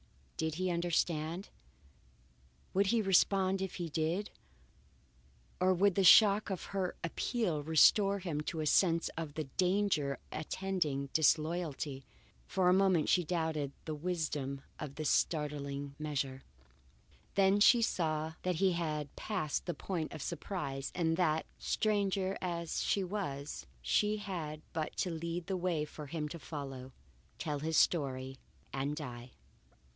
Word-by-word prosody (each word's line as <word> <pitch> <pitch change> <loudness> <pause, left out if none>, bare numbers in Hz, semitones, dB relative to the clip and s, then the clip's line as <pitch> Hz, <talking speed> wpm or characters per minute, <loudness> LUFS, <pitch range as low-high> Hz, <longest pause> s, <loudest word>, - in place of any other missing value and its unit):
Did 160 -1 -2
he 185 +1 0
understand? 170 0 -1 1.2
Would 195 +1 +3
he 225 +2 +2
respond 190 0 +3
if 190 -1 -3
he 175 -2 -3
did; 165 +6 -1 1.3
or 185 +1 +4
would 200 +2 +4
the 195 - +2
shock 205 +3 +7
of 190 -3 -3
her 190 -2 -1
appeal 170 -1 -1
restore 195 +6 +5
him 170 -6 -3
to 160 +1 -3
a - - -1
sense 165 +2 +3
of 160 -3 -5
the 155 - -1
danger 180 -2 +1
attending 155 -4 -2
disloyalty? 155 -3 +1 0.4
For 185 -2 +1
a 180 - +6
moment 190 -4 +3
she 180 - +4
doubted 160 -4 -1
the 155 - -3
wisdom 150 -4 -2 0.2
of 140 -2 -6
this 155 -2 0
startling 145 -2 -1
measure, 140 -3 -2 0.9
then 195 +1 +4
she 230 +3 +6
saw 160 -5 0
that 180 -1 0
he 190 +3 +3
had 155 -4 -3
passed 185 -9 -2
the 175 - -2
point 165 -1 -3
of 155 - -6
surprise 165 -6 -4
and 165 -2 +1
that, 160 -3 +2
stranger 195 -2 0
as 170 -2 -2
she 200 - +1
was, 150 - -4 0.2
she 210 - +2
had 165 -7 -5
but 160 -1 -3
to 180 - 0
lead 170 +1 -4
the 190 - -2
way 175 -4 0
for 150 -1 -9
him 150 +1 -3
to 170 - -7
follow, 135 -3 -7 0.5
tell 150 -2 -3
his 160 +1 0
story, 135 -5 +1 0.3
and 140 +2 -1
die. 125 -5 -7
165 Hz, 140 wpm, -33 LUFS, 150-185 Hz, 1.3 s, shock